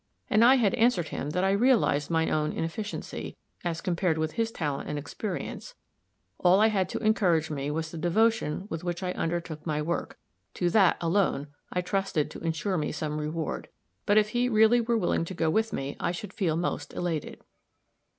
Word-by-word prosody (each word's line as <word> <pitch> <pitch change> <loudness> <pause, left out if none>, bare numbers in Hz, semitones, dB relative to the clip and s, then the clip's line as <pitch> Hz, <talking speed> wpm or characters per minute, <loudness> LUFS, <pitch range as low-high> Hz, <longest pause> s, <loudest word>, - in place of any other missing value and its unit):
And 215 +2 +5
I 255 +3 +8
had 220 -7 +2
answered 225 -8 +2
him 145 - -4
that 180 +5 0
I 195 - +3
realized 200 - +3
my 160 -1 +2
own 155 0 0
inefficiency, 205 +6 -5 0.3
as 170 -2 -2
compared 175 -2 0
with 160 0 -1
his 225 +4 -1
talent 145 -8 -3
and 150 - -2
experience 200 - -5 0.6
all 180 +2 +5
I 220 +1 +5
had 195 -4 0
to - - -3
encourage 180 -8 +2
me 140 -1 -2
was 160 +1 -3
the 165 - -6
devotion 195 -1 +1
with 165 -4 -5
which 175 +1 -3
I 180 - -1
undertook 165 -3 -3
my 150 -2 -1
work 165 +3 -3 0.4
to 175 -1 0
that, 195 -4 +5
alone, 165 -5 +1 0.2
I 180 - 0
trusted 180 -4 -1
to - - -8
insure 165 +3 -1
me 150 - -2
some 150 -1 -3
reward. 155 +1 -3 0.4
But 205 0 +4
if 215 0 +4
he 245 +2 +1
really 220 +1 +5
were 230 0 +1
willing 175 -5 +1
to 185 - -7
go 160 -2 +1
with 220 +4 +1
me, 135 -6 -3
I - - 0
should 195 +2 -7
feel 180 -6 0
almost 170 +2 -3
elated. 165 -4 -3
175 Hz, 190 wpm, -28 LUFS, 160-210 Hz, 0.6 s, I